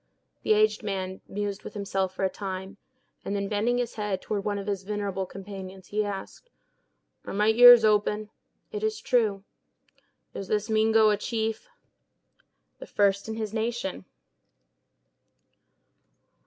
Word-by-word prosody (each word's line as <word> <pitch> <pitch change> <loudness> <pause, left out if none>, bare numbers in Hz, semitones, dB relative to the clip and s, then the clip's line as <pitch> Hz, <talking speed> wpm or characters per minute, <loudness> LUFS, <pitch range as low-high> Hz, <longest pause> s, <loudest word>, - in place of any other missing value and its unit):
The 435 - +3
aged 430 0 +3
man 190 -3 -4
mused 205 0 -4
with - - -9
himself 195 -2 -2
for 195 - 0
a - - +2
time; 190 0 -6 0.5
and 200 - -3
then, 200 0 -1
bending 220 +4 +1
his 245 -2 -2
head 210 -3 -2
toward 205 -2 -3
one 205 -1 -1
of 200 - -5
his 200 -2 -2
venerable 195 -1 -3
companions, 190 -1 -9
he 210 +1 0
asked: 205 - -7 0.8
"Are - - -5
my 210 +2 +3
ears 240 0 +9
open?" 210 0 +1 0.4
"It 425 -2 -4
is 435 0 -1
true." 215 -6 +1 0.9
"Is 195 - -6
this 215 +1 -1
Mingo 220 0 +4
a 210 - +1
chief?" 220 +1 -3 1.1
"The - - -9
first 200 0 +1
in 220 - -3
his 220 -2 -4
nation." 225 - -3
210 Hz, 140 wpm, -27 LUFS, 195-220 Hz, 1.1 s, ears